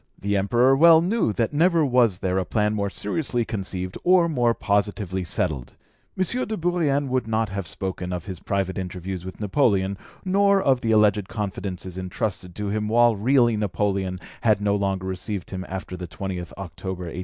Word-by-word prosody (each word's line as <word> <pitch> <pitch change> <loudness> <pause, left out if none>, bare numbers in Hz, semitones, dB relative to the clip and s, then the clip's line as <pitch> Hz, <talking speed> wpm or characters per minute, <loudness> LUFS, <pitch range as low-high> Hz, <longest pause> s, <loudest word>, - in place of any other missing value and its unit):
The 100 +1 -1
Emperor 120 +7 +3
well 165 +3 +7
knew 185 - +1
that 115 +4 -1
never 165 +1 +3
was 120 -7 +3
there 95 0 +1
a - - 0
plan 105 +3 0
more 100 -1 -1
seriously 120 +4 -1
conceived 95 -3 -4
or 180 -1 +5
more 120 -7 +1
positively 100 -2 -1
settled. 80 -6 -2 0.4
M. 190 - +2 0.2
de 220 - -3
Bourrienne 160 -5 +1
would 125 -3 0
not 110 -1 0
have 100 -3 -4
spoken 90 -1 -4
of 90 0 -4
his 95 -4 -6
private 95 -1 -2
interviews 90 0 -5
with 95 0 -8
Napoleon, 100 -4 +1 0.3
nor 200 +1 +4
of 135 -8 +2
the 115 - 0
alleged 105 -2 +3
confidences 95 -3 -5
entrusted 90 -1 -3
to 105 -1 -3
him, 105 +1 -1
while 120 +1 +4
really 120 +2 +3
Napoleon 100 -2 -1 0.2
had 110 -3 +3
no 100 0 +1
longer 95 -2 -1
received 95 +1 -4
him 95 -1 -4
after 95 0 -5
the 90 0 -6
20th 90 +2 -5
October 95 0 -6
1802. 85 0 -6
100 Hz, 180 wpm, -24 LUFS, 95-120 Hz, 0.4 s, well